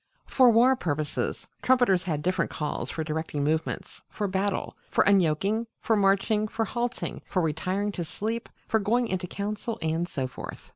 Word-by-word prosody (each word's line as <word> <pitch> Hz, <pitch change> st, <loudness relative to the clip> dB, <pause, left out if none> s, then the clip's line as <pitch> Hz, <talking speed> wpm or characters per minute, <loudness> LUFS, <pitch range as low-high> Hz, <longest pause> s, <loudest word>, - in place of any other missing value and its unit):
For 255 Hz, -2 st, +5 dB
war 240 Hz, +3 st, +6 dB
purposes, 155 Hz, -, -2 dB
trumpeters 245 Hz, -8 st, +3 dB
had 155 Hz, -5 st, -1 dB
different 185 Hz, +1 st, +1 dB
calls 150 Hz, -1 st, -3 dB
for 160 Hz, -, -3 dB
directing 155 Hz, -2 st, -2 dB
movements 155 Hz, +2 st, -2 dB
for 205 Hz, -, -2 dB
battle, 195 Hz, +1 st, -1 dB
for -, -, +3 dB
unyoking, 200 Hz, +4 st, +2 dB
for 225 Hz, -, +2 dB
marching, 205 Hz, +2 st, +3 dB
for 225 Hz, +1 st, -1 dB
halting, 240 Hz, +3 st, -3 dB
for 185 Hz, -, 0 dB
retiring 185 Hz, +6 st, -1 dB
to 180 Hz, -, -3 dB
sleep, 225 Hz, +7 st, -4 dB, 0.2 s
for 220 Hz, -, +2 dB
going 235 Hz, +4 st, +2 dB
into 185 Hz, -3 st, -2 dB
council, 210 Hz, +4 st, -3 dB
and 160 Hz, +2 st, 0 dB
so 135 Hz, -6 st, -2 dB
forth. 130 Hz, -, -8 dB
195 Hz, 160 wpm, -27 LUFS, 160-220 Hz, 0.2 s, war